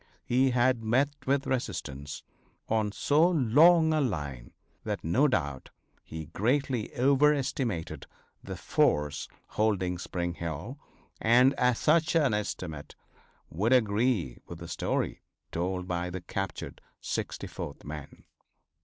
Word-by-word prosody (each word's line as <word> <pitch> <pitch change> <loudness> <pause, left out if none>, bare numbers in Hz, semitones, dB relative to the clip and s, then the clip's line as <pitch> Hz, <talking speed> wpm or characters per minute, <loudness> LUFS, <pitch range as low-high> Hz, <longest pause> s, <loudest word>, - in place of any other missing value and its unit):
He 130 +2 +3
had 125 -1 +2
met 130 +6 +3 0.2
with 135 0 +2
resistance 70 - -4 0.4
on 110 -2 +1
so 150 - +3
long 160 +3 +5
a 155 - +2
line 75 - -3 0.3
that - - -3
no 125 - +3
doubt 70 - -2 0.3
he 80 0 -7
greatly 120 - 0
overestimated 135 - +1 0.4
the - - -6
force 75 -1 +1 0.2
holding 95 -5 0
Spring 85 -1 -3
Hill, 85 - -5 0.4
and 125 +4 +5 0.2
such 160 +6 +2
an 145 -8 +3
estimate 90 -7 -4 0.6
would 105 +10 +1
agree 110 - +2
with 85 - -8
the 85 +1 -9
story - - -2 0.3
told 90 +2 -2
by 90 0 -2
the 90 0 -5
captured 95 +3 -5 0.2
64th 70 - -5
men. 75 -1 -9
110 Hz, 115 wpm, -29 LUFS, 85-135 Hz, 0.6 s, long